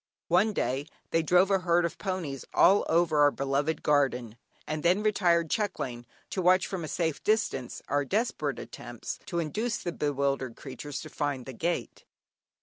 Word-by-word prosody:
One 185 +6 +4
day, 140 -6 -1 0.2
they 165 - +3
drove 180 +4 +4
a 195 - +4
herd 175 -1 +2
of 170 - -4
ponies 180 -9 -3
all 200 +2 +5
over 165 -2 +3
our 145 0 +7
beloved 140 +3 -1
garden, 130 -6 +1 0.3
and 155 0 -3
then 180 +5 +3
retired 175 -6 +2
chuckling, 125 - -2 0.2
to 190 - -1
watch 185 +1 +4
from 185 -3 -4
a - - -4
safe 160 -1 -2
distance, 210 - 0
our 145 0 +1
desperate 190 - -1
attempts 120 0 -7
to 175 - -3
induce 210 +8 -1
the 175 - -4
bewildered 140 -5 -1
creatures 140 +2 -7
to 155 - -9
find 145 -4 -2
the 130 - -7
gate. 170 +8 -3
160 Hz, 165 wpm, -29 LUFS, 140-185 Hz, 0.3 s, our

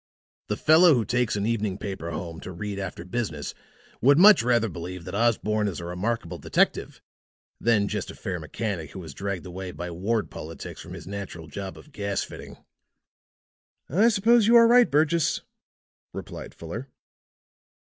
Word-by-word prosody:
The - - -2
fellow 160 0 +6
who 115 -3 0
takes 125 -3 0
an 100 0 -1
evening 105 -4 -1
paper 95 -5 -5
home 85 0 -5
to - - -8
read 100 +3 -5
after 90 -3 -6
business 90 -7 -3 0.5
would 140 +4 +6
much 205 +4 +8
rather 120 -1 +2
believe 90 -1 -7
that - - -7
Osborne 105 -1 +1
is 95 -4 -4
a 85 - -6
remarkable 90 -1 -3
detective - - 0 0.6
than 110 -3 +2
just 105 -2 -3
a - - -8
fair 90 -2 -4
mechanic 80 -1 -4
who 95 - -7
was 80 -5 -8
dragged 100 +2 -4
away, 90 +1 -6
by 90 +2 -6
ward 105 +6 -1
politics, 80 +2 -8
from - - -9
his - - -9
natural 95 -4 -6
job 95 +5 -7
of 150 - -15
gas 100 -5 -2
fitting." - - -10 1.3
"I 200 - +4
suppose 225 +1 +4
you 235 - +6
are 230 0 +9
right, 245 +1 +6
Burgess," 155 +2 +2 0.7
replied - - -8
Fuller. 110 +11 -7
100 Hz, 165 wpm, -26 LUFS, 90-120 Hz, 1.3 s, are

